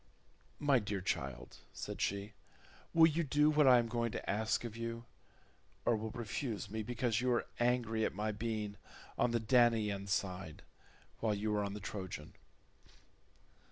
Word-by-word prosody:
"My 140 -3 +4
dear 100 -2 -3
child," 70 -9 -3 0.2
said - - -5
she, 100 +2 -1 0.6
"will 165 -1 +7
you 165 +1 +2
do 150 +1 +3
what 150 -2 +5
I 125 -1 +9
am 120 -1 +2
going 115 0 -1
to - - -5
ask 110 +3 0
of 115 -2 -6
you, 115 0 -5 0.8
or 120 - +4
will 110 +1 -3
you - - -9
refuse 115 -3 -3
me 110 0 -2
because 120 0 0
you 125 0 +2
are 120 - +1
angry 120 -2 +1
at - - -1
my 105 +2 -1
being 105 -1 -3 0.4
on - - +2
the 115 0 +1
Danaan 110 -4 +3
side, 90 -4 -2 0.6
while 110 -2 +1
you 105 +1 -1
are 105 - +1
on 100 0 -3
the - - -5
Trojan?" 95 -2 -6
110 Hz, 165 wpm, -35 LUFS, 105-120 Hz, 0.8 s, I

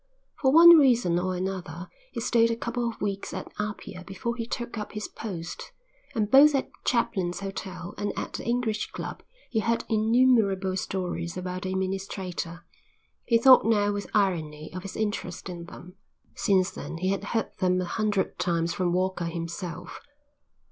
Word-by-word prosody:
For 265 -3 +4
one 335 +2 +10
reason 235 - +4
or 185 +1 -1
another 180 -2 -4 0.2
he - - -4
stayed 230 -1 +3
a 230 - 0
couple 235 +1 -2
of 225 - -9
weeks 200 -1 -3
at - - -6
Apia 210 -3 -5
before 195 +6 -4
he 230 -1 -4
took 240 -1 -4
up 210 -2 -5
his 210 -1 -4
post 175 -6 -7 0.4
and 215 -2 0
both 285 +2 +8
at 270 - -1
Chaplin's 195 -7 0
hotel 185 -2 -6
and 205 - -1
at - - -4
the - - -5
English 235 -3 0
club - - -6 0.3
he 225 - +1
heard 230 +2 0
innumerable 220 -4 +3
stories 180 -2 -3
about 180 0 -4
the 185 - -3
administrator. 190 -2 -4 0.6
He 230 - +4
thought 255 +2 +8
now 205 -2 +2
with 205 0 -4
irony 160 -7 0
of 185 - -5
his 195 0 -8
interest 205 -4 -3
in 170 -1 -7
them. 180 +1 -12 0.4
Since 190 -2 +2
then - - -7
he 185 +3 -1
had 195 0 -1
heard 225 -2 -1
them 180 0 +2
a 185 - -1
hundred 210 0 -1
times 170 -1 0
from 180 -2 0
Walker 185 -1 0
himself. 170 +1 -5
195 Hz, 170 wpm, -27 LUFS, 180-225 Hz, 0.6 s, one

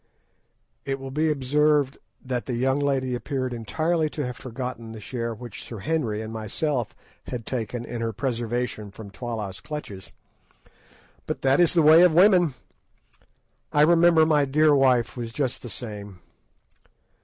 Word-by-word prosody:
It 135 0 -3
will 135 0 -7
be 155 +3 +1
observed 145 0 +2 0.3
that 125 -2 -3
the 125 - -2
young 130 +3 +1
lady 135 -3 0
appeared 130 +1 -3
entirely 155 +8 0
to 150 -2 -4
have 125 -1 -5
forgotten 125 -3 -6
the 110 - -8
share 115 +2 -4
which 115 -1 -9
Sir 115 - -8
Henry 115 -4 -1
and 110 0 -7
myself 115 +3 -2 0.3
had 120 -3 -5
taken 120 -1 -4
in 120 -1 -5
her 115 0 -1
preservation 120 -2 -3
from 100 0 -11
Twala's 110 -5 -5
clutches. 105 -11 -7 1.2
But - - -4
that 135 +2 +4
is 175 0 +4
the 165 - +5
way 160 +2 +8
of 180 -3 +5
women! 180 -6 +5 1.2
I 150 - +3
remember 165 0 +5
my 150 -2 +3
dear 150 +2 +4
wife 130 -4 +3
was 120 -2 -5
just 130 0 -2
the 120 - -8
same. 105 -5 -7
130 Hz, 155 wpm, -25 LUFS, 115-150 Hz, 1.2 s, way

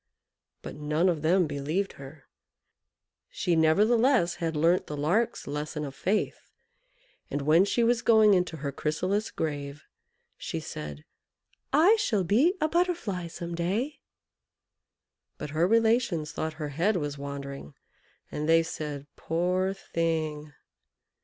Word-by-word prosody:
But - - -7
none 150 +4 +1
of 165 -4 -1
them 175 +3 +3
believed 150 +7 -2
her. 135 +1 -11 1.1
She 175 - 0
nevertheless 210 - +3
had 165 -1 -2
learnt 165 +4 +2
the 150 - -5
Lark's 210 +11 0
lesson 150 +1 -4
of 140 - -7
faith, 190 +9 -2 0.8
and 145 - -3
when 160 +6 +5
she 235 +3 +1
was 235 0 +2
going 220 -3 +5
into 180 -3 0
her 140 -1 -4
chrysalis 185 +9 -1
grave, 145 -1 -4 0.5
she - - -4
said 75 0 -7 0.7
"I 350 +10 +5
shall 215 - +1
be 255 - +3
a 310 - +2
Butterfly 330 - -1
some 170 +1 -7
day!" 215 - -2 1.4
But 150 - -6
her 160 +3 +2
relations 225 -8 +2
thought 160 0 -3
her 155 -1 -5
head 175 +9 +1
was 145 -4 -3
wandering, 140 - -7 0.6
and 150 +1 -3
they 165 0 +5
said, 150 -3 -5
"Poor 180 +3 0
thing!" 160 -5 -2
165 Hz, 130 wpm, -28 LUFS, 150-205 Hz, 1.4 s, when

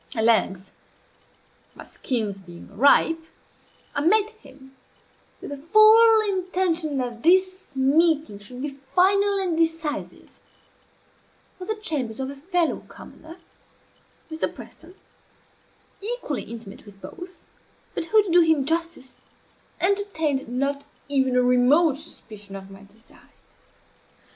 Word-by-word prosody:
At 220 - 0
length, 200 -4 +1 1.0
my - - -11
schemes 220 -6 -3
being 175 +2 -14
ripe, 305 +7 +3 0.7
I 285 - -1
met 420 +7 +2
him 270 - -18 0.6
(with - - -9
the 285 - -5
full 435 +8 +6
intention 365 -6 -1
that 240 -3 -4
this 370 0 +1
meeting 290 -3 +2
should 245 +6 -9
be 295 - -2 0.3
final 395 +2 +3
and 370 -4 -1
decisive) 325 -2 -3 1.3
at 365 - -8
the 435 - -1
chambers 285 - -2
of 265 +1 -3
a - - -10
fellow 340 +3 -1
commoner 325 +2 -13 0.9
(Mr. 315 - -2
Preston) 345 +3 -14 1.1
equally 405 - -3
intimate 220 -2 -11
with 200 -1 -15
both, 360 - -11 0.5
but - - -3
who, 425 +5 +4
to 385 - -5
do 350 +1 +6
him 320 -4 +2
justice, 330 -4 -4 0.6
entertained 335 - 0
not 275 +3 -2 0.3
even 265 -2 +1
a 250 - +3
remote 260 +5 +3
suspicion 210 -10 -11
of 195 0 -10
my 195 0 -13
design. 220 +4 -21
310 Hz, 120 wpm, -24 LUFS, 250-365 Hz, 1.3 s, full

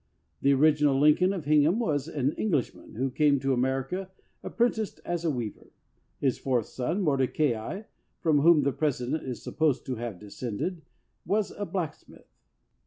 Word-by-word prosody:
The 140 - +4
original 145 -1 +4
Lincoln 150 +6 +5
of 180 -7 -4
Hingham 150 +5 +4
was 155 - 0
an 145 -4 0
Englishman 155 - -2
who 130 +3 -1
came 145 0 +3
to 135 0 0
America 135 +9 -1 0.3
apprenticed 225 -3 -1
as 175 -1 -2
a 165 - +1
weaver. 120 -7 -5 0.5
His 135 -3 0
fourth 125 -5 0
son, 165 +10 -2
Mordecai, 140 - 0 0.4
from 155 -4 +3
whom 155 0 +5
the 140 0 +1
President 145 0 -1
is 125 -3 -6
supposed 155 -5 0
to 130 -2 -3
have 115 -4 -5
descended, 115 - -5 0.4
was 210 0 0
a 205 - -5
blacksmith. 175 -6 -5
145 Hz, 150 wpm, -28 LUFS, 130-170 Hz, 0.5 s, Lincoln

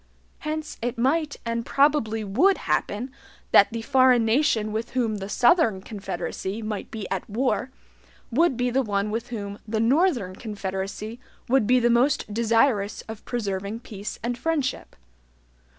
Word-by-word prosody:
Hence 310 0 -4
it 245 +1 -2
might 290 +5 +1
and 230 0 -1
probably 275 -6 +2
would 275 - +3
happen 240 +6 -1 0.4
that - - +7
the 230 0 -4
foreign 255 -3 +4
nation 225 -3 +2
with 220 +2 -4
whom 225 -4 +1
the 195 0 -6
SOUTHERN 235 - +3
confederacy 200 0 -5
might 215 -1 -4
be 215 -4 -6
at 190 +2 -3
war 255 +3 0 0.6
would 280 +1 +3
be 250 0 0
the 265 +2 +2
one 205 -3 -1
with 230 +2 -3
whom 205 -4 -6
the 220 +1 -1
NORTHERN 240 - +2
confederacy 205 +1 -5 0.3
would 255 -4 +3
be 255 +1 +5
the 240 0 +3
most 245 -2 +2
desirous 225 -2 +2
of 220 -1 -9
preserving 205 -1 -3
peace 205 -3 -7
and 240 0 -2
friendship. 290 -1 -2
230 Hz, 150 wpm, -25 LUFS, 210-260 Hz, 0.6 s, that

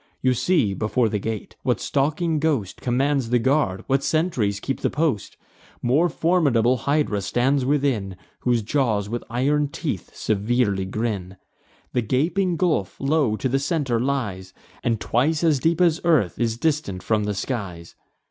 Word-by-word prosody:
You 130 0 +4
see, 125 - +1
before 110 +3 0
the 105 - -1
gate, 110 +1 -5
what - - 0
stalking 155 +3 0
ghost 140 - -1
Commands 135 0 +1
the 125 - +3
guard, 130 -6 +1
what 135 +1 +1
sentries 130 - 0
keep 135 +5 -3
the - - 0
post. 145 -9 -1 0.4
More 145 +9 +2
formidable 145 -9 +2
Hydra 140 -5 0
stands 125 +7 +1
within, 130 -9 0 0.2
Whose 120 -3 +1
jaws 110 -5 0
with 120 +1 -3
iron 145 +5 +1
teeth 145 - -5
severely 105 -2 0
grin. 100 -2 -3 0.6
The 125 - +2
gaping 165 - 0
gulf 155 - 0
low 135 -5 +1
to 130 - -2
the 135 +2 +1
centre 140 -5 0
lies, 105 -8 -2 0.3
And 115 -3 0
twice 150 +10 +1
as 155 -5 +3
deep 165 +4 +1
as 170 -2 +3
earth 155 - +2
is 115 -1 0
distant 140 - -1
from 110 -2 +1
the 105 -1 -2
skies. 95 -7 -5
125 Hz, 155 wpm, -23 LUFS, 105-150 Hz, 0.6 s, You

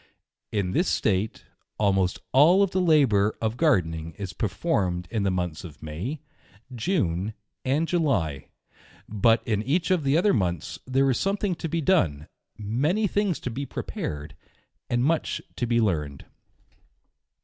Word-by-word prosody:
In 100 -4 -1
this 175 - +1
state, 105 +1 0 0.3
almost 95 -3 +2
all 170 +9 +6
the 185 -1 -1
labour 130 - +3
of 110 0 -1
Gardening 85 - +1
is 95 -3 -5
per 110 - -1
formed 90 - -1
in 110 -3 0
the 100 - +1
months 90 -4 -2
of 75 -5 -11
May, 95 - -5 0.5
June, 110 - -1 0.3
and 145 +5 +1
July; 110 - 0 0.6
but 115 +2 +3
in 105 -3 +1
each 165 +10 0
of 180 -5 +2
the 140 +2 +3
other 200 +4 +3
months, 90 - -1
there 135 +1 +2
is 125 - 0
something 195 -1 0
to 165 -1 -5
be 165 +1 -1
done, 80 - +2 0.3
fnany 145 - +1
things 200 -3 0
to 125 - -4
be 135 +4 -4
prepared, 75 0 -5 0.5
and 120 0 +1
much 165 +2 0 0.2
to 120 - -1
be 120 0 +2
learned. 75 -10 -1
115 Hz, 150 wpm, -26 LUFS, -, 0.6 s, all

